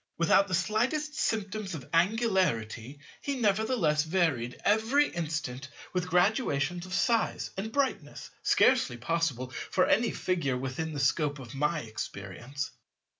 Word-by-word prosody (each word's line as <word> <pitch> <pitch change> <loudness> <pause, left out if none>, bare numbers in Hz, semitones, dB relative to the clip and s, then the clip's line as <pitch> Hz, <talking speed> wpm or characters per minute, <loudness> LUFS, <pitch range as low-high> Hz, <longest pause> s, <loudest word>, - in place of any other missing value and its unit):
Without 170 +4 +4
the 185 - 0
slightest 240 - 0
symptoms 210 - -2
of 135 -6 -8
angularity 165 - +1 0.2
he 280 - -2
nevertheless 205 -7 +2
varied 160 -8 0
every 225 +8 +3
instant 150 -5 -4 0.3
with 180 -1 -1
graduations 180 - +1
of 185 - -7
size 230 +3 +1
and 215 +3 -4
brightness 280 +1 -2
scarcely 235 - +3
possible 130 -2 -1 0.2
for 185 - +3
any 235 +1 +3
Figure 170 -9 -1
within 135 +5 -4
the 145 - -4
scope 145 +2 +1
of 130 -1 -10
my 150 +3 0
experience. 110 +5 -6
170 Hz, 125 wpm, -29 LUFS, 140-215 Hz, 0.3 s, Without